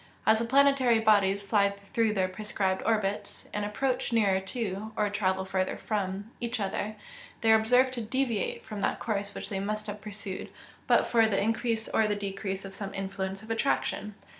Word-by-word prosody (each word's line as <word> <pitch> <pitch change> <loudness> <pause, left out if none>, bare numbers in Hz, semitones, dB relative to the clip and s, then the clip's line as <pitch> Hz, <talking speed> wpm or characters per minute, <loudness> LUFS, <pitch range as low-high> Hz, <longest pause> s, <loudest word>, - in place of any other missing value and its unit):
As 220 0 +5
the 230 - 0
planetary 270 -1 +4
bodies 200 -2 +3
fly 200 0 +3
through 205 +2 -1
their 190 -2 +2
prescribed 190 0 -1
orbits, 210 -2 -1
and 210 - -1
approach 250 +5 -1
nearer 205 -5 +3
to, 210 0 -4
or 210 - +2
travel 190 -2 0
further 190 0 -1
from, 200 0 -3
each 240 0 -2
other, 205 +2 -2 0.5
they 225 -1 +4
are 220 - +7
observed 250 +4 +4
to 240 - -3
deviate 230 -1 -1
from 210 -2 -6
that - - 0
course 200 -2 -2
which - - -6
they 195 - -2
must 215 +2 -2
have 210 -1 -6
pursued 200 -2 -6 0.4
but - - +5
for 230 -2 +4
the 200 -3 +1
increase 225 +1 0
or 220 - +2
the 205 - 0
decrease 195 -1 -4
of 195 - -7
some 195 0 -5
influence 195 0 -4
of 220 - -7
attraction. 225 -3 0
210 Hz, 185 wpm, -29 LUFS, 195-225 Hz, 0.5 s, are